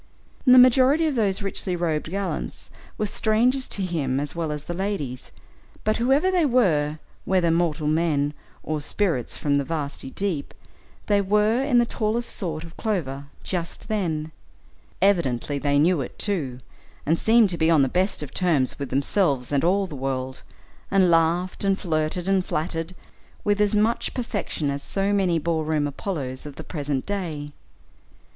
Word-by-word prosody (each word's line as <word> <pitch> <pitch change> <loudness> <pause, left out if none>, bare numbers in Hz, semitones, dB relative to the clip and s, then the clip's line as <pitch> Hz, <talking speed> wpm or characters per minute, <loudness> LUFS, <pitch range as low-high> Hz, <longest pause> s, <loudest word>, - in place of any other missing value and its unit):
The 255 0 +8
majority 260 +5 +6
of 310 - +1
those 205 -4 +1
richly 195 -2 -1
robed 160 -3 -1
gallants 195 +2 -4 0.3
were 215 - 0
strangers 235 +5 +1
to 195 - -2
him 140 -7 -1
as 145 0 -2
well 165 -2 -2
as 150 -1 -5
the 175 - -5
ladies, 175 -10 -4 0.5
but 215 0 +1
whoever 270 +10 +3
they 360 -2 +3
were, 170 - +2 0.3
whether 180 -3 +2
mortal 165 -2 0
men 150 -2 +1 0.3
or 155 -1 -2
"spirits 160 - -1
from 140 -1 +1
the - - 0
vasty 145 -3 -4
deep," 175 -2 -3 0.5
they 205 -1 +3
were 210 +5 +2
in 275 -3 +2
the 240 - +5
tallest 230 +1 -2
sort 160 -5 -3
of 165 0 -11
clover 145 - -2 0.2
just 175 +4 -4
then. 160 -7 -1 0.7
Evidently 145 -8 +1
they 145 0 +1
knew 160 +1 +3
it, 125 - -7
too, 150 -12 -1 0.5
and 165 +3 +2
seemed 225 -3 +4
to 170 - -2
be 160 - +3
on 155 -4 +5
the - - +2
best 185 +3 0
of 140 - -9
terms 155 -9 +1
with 140 -2 -4
themselves 140 -1 +1
and 140 -1 +1
all 195 +3 +2
the 160 - -8
world, 130 -1 -3 0.5
and 190 -3 +4
laughed, 170 +4 +2
and 195 -1 +2
flirted, 165 0 -1
and 195 -1 +2
flattered, 165 +2 -3 0.5
with 205 0 +1
as 210 0 +2
much 220 +3 +1
perfection 205 - -2
as 140 0 -4
so 195 +5 -1
many 185 -4 +2
ball 160 0 0
room 155 -1 0
Apollos 140 -3 -4
of 145 - -9
the - - -8
present 145 -4 -3
day. 160 -8 -4
170 Hz, 165 wpm, -24 LUFS, 145-205 Hz, 0.7 s, The